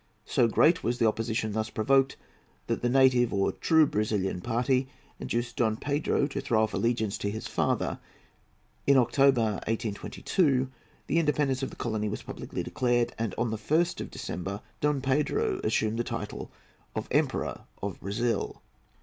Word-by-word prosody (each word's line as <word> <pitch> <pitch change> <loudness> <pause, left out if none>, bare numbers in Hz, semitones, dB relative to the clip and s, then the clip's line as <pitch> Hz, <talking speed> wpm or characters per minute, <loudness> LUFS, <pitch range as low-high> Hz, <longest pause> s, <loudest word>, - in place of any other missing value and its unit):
So 120 - +3
great 160 +9 +4
was 120 +2 0
the 115 - +2
opposition 110 0 -1
thus 110 +1 -2
provoked 135 +5 +2 0.5
that - - -2
the 120 - +1
native 125 -2 +4
or 100 -1 +1
true 160 -1 +4
Brazilian 105 -6 -1
party 125 +3 +1 0.3
induced 120 0 -3
Don 110 -2 +2
Pedro 145 +1 0
to 140 -1 -3
throw 115 -5 +2
off 110 - -1
allegiance 115 -3 0
to 100 - -1
his 110 +2 -5
father. - - 0 0.9
In 140 -1 +6
October, 120 -4 +3
1822, 130 - 0 0.3
the 165 - +2
independence 145 -4 +1
of 135 - -2
the - - -11
colony 110 -3 -2
was 105 - -5
publicly - - -5
declared, 120 -2 +1
and 115 -4 -2
on 115 -1 0
the 110 - -2
1st 160 +9 +1
of - - -5
December 100 +3 -5 0.2
Don 150 -2 +1
Pedro 375 - 0
assumed 110 - +1
the - - +2
title - - -5 0.5
of - - -3
Emperor - - 0 0.2
of 100 -3 -3
Brazil. 115 +4 -2
120 Hz, 160 wpm, -28 LUFS, 110-135 Hz, 0.9 s, In